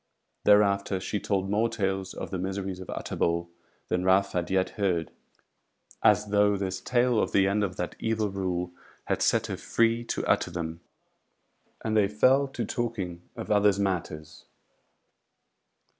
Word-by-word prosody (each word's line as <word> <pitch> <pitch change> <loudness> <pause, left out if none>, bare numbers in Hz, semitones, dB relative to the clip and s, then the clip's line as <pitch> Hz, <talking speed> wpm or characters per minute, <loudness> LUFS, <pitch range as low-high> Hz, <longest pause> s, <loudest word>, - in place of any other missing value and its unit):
Thereafter 100 -2 +4
she 100 +2 -3
told 95 -2 -1
more 105 +4 +1
tales 95 -2 -2
of - - -6
the 95 - -2
miseries 95 0 -3
of 95 - -9
Utterbol 85 0 -1 0.4
than 90 0 0
Ralph 95 +1 +3
had 90 -1 -2
yet 95 -1 +1
heard, 90 -6 -1 0.9
as 105 - +4
though 105 0 +3
this 95 -1 -3
tale 125 -2 +2
of - - -1
the 95 -1 +4
end 105 +2 +1
of 90 -3 -2
that 90 - -4
evil 110 -2 -1
rule 90 -2 -2 0.3
had - - -1
set - - +2
her - - -4
free 115 0 +1
to - - -2
utter - - +2
them; 85 -1 -5 1.0
and 110 -1 0
they 105 -2 +4
fell 130 +7 +3
to 135 - -4
talking 95 -8 -4
of - - -6
others 105 -1 +4
matters. 85 -6 -3
100 Hz, 155 wpm, -27 LUFS, 90-105 Hz, 1.0 s, Thereafter